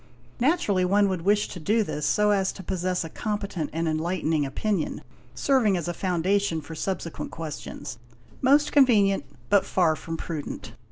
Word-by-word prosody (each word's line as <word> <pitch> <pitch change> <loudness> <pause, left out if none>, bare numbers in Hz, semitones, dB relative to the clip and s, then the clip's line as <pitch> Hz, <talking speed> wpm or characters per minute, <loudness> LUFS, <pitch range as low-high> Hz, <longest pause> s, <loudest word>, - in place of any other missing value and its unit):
Naturally 240 - +2
one 200 +2 +3
would 185 -3 -2
wish 205 +4 +2
to 180 - -7
do 215 +7 +2
this 150 -7 -2
so 210 +7 +3
as 195 -2 +2
to 190 - -9
possess 180 0 -1
a 165 - -6
competent 200 -6 -3
and 165 +1 -1
enlightening 160 -2 0
opinion, 185 +5 -2 0.3
serving 240 -9 +3
as 170 - -3
a 175 - -1
foundation 185 0 0
for 155 +1 -9
subsequent 170 0 -4
questions: 145 -5 -7 0.4
most 285 +3 +4
convenient 215 -9 +4 0.3
but 200 -1 +5
far 170 -4 +2
from 165 +1 -6
prudent. 155 -4 -6
185 Hz, 160 wpm, -26 LUFS, 165-205 Hz, 0.4 s, but